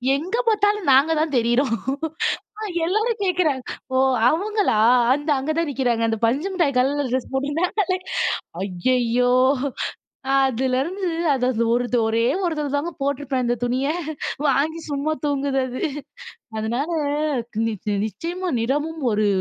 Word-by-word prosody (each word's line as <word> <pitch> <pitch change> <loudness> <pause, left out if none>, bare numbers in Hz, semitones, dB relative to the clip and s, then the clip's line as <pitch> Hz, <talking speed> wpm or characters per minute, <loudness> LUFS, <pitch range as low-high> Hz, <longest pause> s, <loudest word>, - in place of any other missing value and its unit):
எங்க 350 +11 -2
பாத்தாலும் 420 -5 +2
நாங்க 275 +5 +5
தான் 310 -3 -1
தெரியிறோம். 240 +1 +2 1.1
எல்லாரும் 430 +5 0
கேட்கிறாங்க, 340 -8 +1 0.3
ஓ - - +4 0.3
அவங்களா! 405 - +1 0.4
அந்த 290 +2 -2
அங்க 270 +4 -3
தான் 335 -2 +1
நிக்கிறாங்க. 245 -4 0
அந்த 225 0 -1
பஞ்சுமிட்டாய் 300 +3 0
கலருல 280 +2 +1
ட்ரெஸ் 255 0 -2
போட்டிருந்தாங்களே. 345 +8 0 0.7
ஐயய்யோ! 245 +6 +1 1.1
அதுலருந்து 265 - 0 0.2
அது 250 -3 +1
ஒரு 245 0 0 0.2
ஒரே 225 +1 +1 0.2
ஒருதர 305 -4 -1
தாங்க 325 +4 -2
போட்டிருப்பேன் 275 -2 -1
அந்த 240 0 +1
துணிய. 255 +3 0 0.6
வாங்கி 305 +5 +1
சும்மா 290 +2 0
தூங்குது 280 -1 0
அது. 255 +1 -6 0.8
அதனால 235 +7 -1 0.8
நி 225 - 0 0.3
நிச்சயமா 345 - -4
நிறமும் 295 +6 -1
ஒரு 210 0 +2
280 Hz, 115 wpm, -22 LUFS, 250-330 Hz, 1.1 s, நாங்க